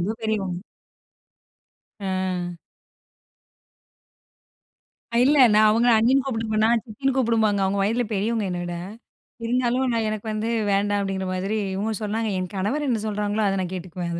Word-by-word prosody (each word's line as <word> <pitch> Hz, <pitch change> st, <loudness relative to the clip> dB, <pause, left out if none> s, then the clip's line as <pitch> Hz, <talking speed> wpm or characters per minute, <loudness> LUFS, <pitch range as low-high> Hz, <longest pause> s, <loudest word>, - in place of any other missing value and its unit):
ரொம்ப 185 Hz, +5 st, -1 dB
பெரியவங்க. 195 Hz, -5 st, -2 dB, 1.4 s
அ. 185 Hz, -2 st, -2 dB, 2.7 s
இல்ல, 290 Hz, +3 st, +4 dB, 0.2 s
நான் 215 Hz, 0 st, +6 dB
அவங்கள 235 Hz, +3 st, +4 dB
அண்ணின்னு 255 Hz, +5 st, +3 dB
கூப்பிட்ருப்பேனா, 225 Hz, -3 st, 0 dB
சித்தின்னு 255 Hz, +4 st, -2 dB
கூப்புடும்பாங்க. 220 Hz, -5 st, +2 dB
அவங்க, 195 Hz, +1 st, 0 dB
வயதுல 230 Hz, +5 st, +1 dB
பெரியவங்க 215 Hz, +1 st, 0 dB
என்ன 175 Hz, -1 st, -3 dB
விட. 175 Hz, 0 st, -4 dB, 0.7 s
இருந்தாலும், 250 Hz, +2 st, +1 dB
நான் 225 Hz, -1 st, 0 dB
எனக்கு 215 Hz, +1 st, -5 dB
வந்து 215 Hz, +2 st, -2 dB, 0.2 s
வேண்டாம் 205 Hz, +1 st, +1 dB
அப்படிங்கிற 190 Hz, -1 st, -2 dB
மாதிரி, 195 Hz, +4 st, -1 dB, 0.2 s
இவுங்க 215 Hz, +3 st, -2 dB
சொன்னாங்க. 220 Hz, +2 st, -1 dB
என் 185 Hz, +2 st, -5 dB
கணவர் 265 Hz, +11 st, -1 dB
என்ன 230 Hz, -3 st, +1 dB
சொல்லுறாங்களோ, 210 Hz, 0 st, -1 dB
அத 195 Hz, 0 st, +1 dB
நான் 180 Hz, -, -5 dB
கேட்டுக்குவேன் 175 Hz, -1 st, -5 dB
215 Hz, 130 wpm, -24 LUFS, 195-230 Hz, 2.7 s, நான்